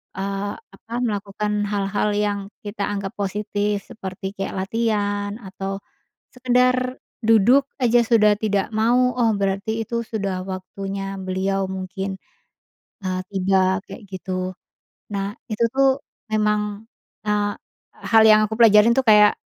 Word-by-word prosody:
eee, 195 +1 -3 0.2
apa, 225 +4 -13
melakukan 210 -1 -2
hal-hal 200 +1 0
yang 205 -1 0 0.3
kita 205 0 -6
anggap 200 -1 -3
positif, 205 0 -2
seperti 190 -4 -6
kayak 195 0 -4
latihan 205 -2 -1
atau 195 -2 -5 0.6
sekedar 255 0 +2 0.3
duduk 225 +5 +5
aja 240 -1 +4
sudah 215 -2 +5
tidak 205 -3 0
mau, 245 +3 +3
oh, 230 -2 +3
berarti 200 +3 -1
itu 235 -1 -1
sudah 195 -4 -3
waktunya 195 +1 -5
beliau, 190 +1 -1
mungkin, 190 +1 -4 0.9
eee, 185 0 -1
tiba, 190 -1 +2
kayak - - -10
gitu. 185 0 -4 0.6
Nah, 200 0 -2 0.2
itu 215 +2 +1
tuh 270 0 +3 0.3
memang, 210 0 0 0.4
eee, 205 0 +1 0.6
hal 225 -1 +7
yang 215 0 +7
aku 220 - -4
pelajarin 220 0 +7
tuh 265 - +2
kayak, 210 -1 +7
205 Hz, 125 wpm, -22 LUFS, 195-225 Hz, 0.9 s, hal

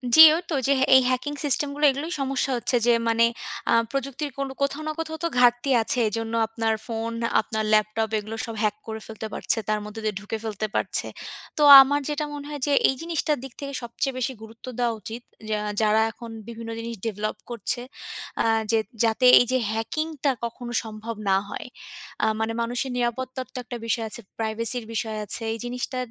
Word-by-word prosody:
জি, 315 - +10
ঐ - - +1
তো - - -2
যে, 280 - +4 0.2
এই 260 - +8
হ্যাকিং 255 +3 -1
সিস্টেমগুলো 290 +1 +3
এগুলোই 290 +5 -5
সমস্যা 270 0 0
হচ্ছে 240 - +1
যে, - - +6 0.2
মানে 230 0 +3 0.5
আ - - +4 0.2
প্রযুক্তির 275 +2 -3
কোনো 275 -1 -2
কোথাও 280 +2 0
না - - 0
কোথাও 320 -1 -4
তো - - +2
ঘাটতি 245 +2 +4
আছে 225 - +2
এজন্য 225 +1 -3
আপনার 225 0 -1
ফোন 230 0 -3 0.3
আপনার 220 0 -3
ল্যাপটপ 215 +1 +2
এগুলো 215 +1 -5
সব 230 - -6
হ্যাক 210 -1 +1
করে 220 0 -5
ফেলতে 220 0 -6
পারছে - - 0
তার 215 - +1
মধ্যে 210 +1 -8
দিয়ে 215 -2 -1
ঢুকে 205 +2 -5
ফেলতে 215 -1 -3
পারছে। - - 0 0.5
তো 300 - 0 0.2
আমার 285 +2 +2
যেটা 300 0 -1
মনে 290 -1 -7
হয় 295 -1 -5
যে, 290 - +2 0.2
এই 265 - 0
জিনিসটার 325 -3 -1
দিক 270 -2 -9
থেকে 280 -1 -6
সবচেয়ে 250 +3 -2
বেশি 255 +1 -1
গুরুত্ব 225 +1 -12
দেওয়া 240 -1 +1
উচিত 225 +3 -7 0.3
যা 215 -1 0 0.2
যারা 215 0 +4
এখন 235 0 -10 0.2
বিভিন্ন 230 -1 -7
জিনিস 230 0 -5
ডেভেলপ 215 -1 -3
করছে 240 +1 -2 0.6
আ - - 0 0.3
যে, 225 - +3 0.2
যাতে 230 +2 +2
এই - - +3
যে, 255 - +3
হ্যাকিংটা 290 +6 -1
কখনো 240 +1 -6
সম্ভব 220 +1 -7
না 190 - +5
হয়। - - -6 0.6
আ - - +5
মানে 220 +1 -1
মানুষের 245 +3 -2
নিরাপত্তার 255 +2 -2
তো - - -7
একটা 245 0 -6
বিষয় 230 0 0
আছে। 235 - -2 0.2
প্রাইভেসির 225 +2 +2
বিষয় 220 -1 -2
আছে। 205 - 0
এই - - -4
জিনিসটা 250 +1 -4
235 Hz, 190 wpm, -25 LUFS, 220-270 Hz, 0.6 s, জি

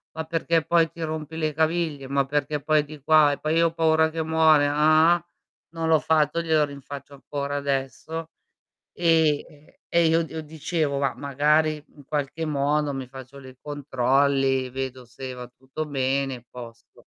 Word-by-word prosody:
ma 160 - -3
perché 165 0 0
poi 165 -1 +3
ti 170 0 -12
rompi 160 0 -4
le 155 -1 -1
caviglie, 160 -3 -1
ma 140 0 +1
perché 145 +1 -2
poi 150 0 +2
di 150 0 -11
qua, 155 -2 +5
e - - -4
poi 155 +1 -1
io 165 0 +4
ho 165 - -5
paura 160 -1 +3
che 160 0 -3
muore, 160 -2 +4
ah 155 +3 +4
ah"; 175 -1 -7 0.5
non 165 -1 -2
l'ho 160 -1 +5
fatto 160 +1 +1
glielo 160 -2 +2
rinfaccio 140 0 -10
ancora 140 +1 -4
adesso, 140 +4 -3 0.6
e 160 -3 +2
e 150 -1 -21
e 170 0 +3
io 165 +1 +3
io 160 -1 -5
dicevo: 155 -1 -2
"Ma 140 - +1
magari 150 +2 +1
in 145 - -15
qualche 150 +3 -3
modo 145 0 0
mi 135 -2 -6
faccio 130 +1 -11
le 130 -1 -13
controlli, 135 -1 +1
vedo 130 -1 -5
se 130 +2 -8
va 125 -1 -8
tutto 130 +5 -7
bene 135 -1 -1
e 120 0 -16
posto." 115 -2 -13
150 Hz, 175 wpm, -24 LUFS, 135-160 Hz, 0.6 s, qua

